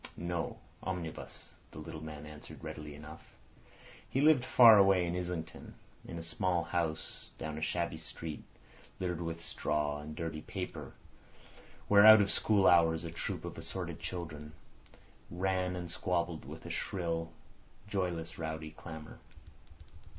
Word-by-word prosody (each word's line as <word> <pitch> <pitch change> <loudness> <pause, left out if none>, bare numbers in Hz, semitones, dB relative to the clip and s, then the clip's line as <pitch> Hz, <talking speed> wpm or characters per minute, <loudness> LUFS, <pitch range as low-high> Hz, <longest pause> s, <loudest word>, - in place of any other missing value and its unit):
"No; 85 -1 -2 0.2
omnibus," 90 -4 -6 0.2
the - - -13
little 80 0 -7
man 75 -1 -7
answered 75 0 -11
readily 75 -1 -6
enough. 75 +1 -12 0.7
He 135 - 0
lived 145 -3 +6
far 115 -4 +9
away 95 -2 +5
in 85 0 -2
Islington, 90 -2 -5 0.3
in 85 - -7
a 85 - -5
small 85 +1 0
house 85 -2 -3
down 80 -1 -4
a 80 - -5
shabby 80 0 -1
street, 80 -1 -7 0.6
littered 90 -2 -2
with 85 0 -4
straw 75 -3 -1
and 75 +1 -7
dirty 80 -1 -4
paper, - - -6 0.9
where 100 0 +7
out 110 0 +11
of 100 -1 +3
school 100 -3 +3
hours 80 -2 +5
a 85 - -5
troop 85 - -4
of - - -6
assorted 85 -4 -5
children 80 -4 -6 0.8
ran 90 0 0
and 90 -1 -5
squabbled 85 -2 -1
with - - -9
a - - -5
shrill, 85 -3 -2 0.6
joyless, 90 -6 -2
rowdy 80 -1 -4
clamour. 80 0 -9
85 Hz, 140 wpm, -33 LUFS, 80-90 Hz, 0.9 s, out